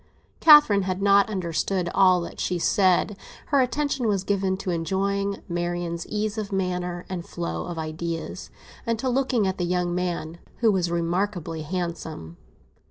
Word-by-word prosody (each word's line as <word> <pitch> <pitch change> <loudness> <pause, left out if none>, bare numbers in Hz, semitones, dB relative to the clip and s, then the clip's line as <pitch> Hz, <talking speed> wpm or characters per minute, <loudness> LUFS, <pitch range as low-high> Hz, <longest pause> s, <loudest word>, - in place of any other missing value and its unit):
Catherine 295 -10 +7
had 185 0 -2
not 200 +1 +4
understood 180 -1 -1
all 185 -2 +5
that 170 - -8
she 180 - -1
said; 190 +2 +2 0.3
her 280 -2 +4
attention 265 -1 0
was 200 -3 +1
given 190 -1 0
to 190 -1 -3
enjoying 195 +4 -1
Marian's 175 -1 -3
ease 215 +1 -2
of 205 -2 -5
manner 180 -2 -2
and 180 -2 -4
flow 170 0 -4
of 175 -1 -5
ideas, 160 +1 -5 0.3
and 230 -1 -1
to 260 - -3
looking 255 -3 +1
at 190 0 -2
the - - 0
young 175 0 0
man, 175 -2 -3 0.2
who 225 -2 +3
was 180 -3 0
remarkably 170 -1 -2
handsome. 160 - -5
185 Hz, 155 wpm, -25 LUFS, 170-200 Hz, 0.3 s, Catherine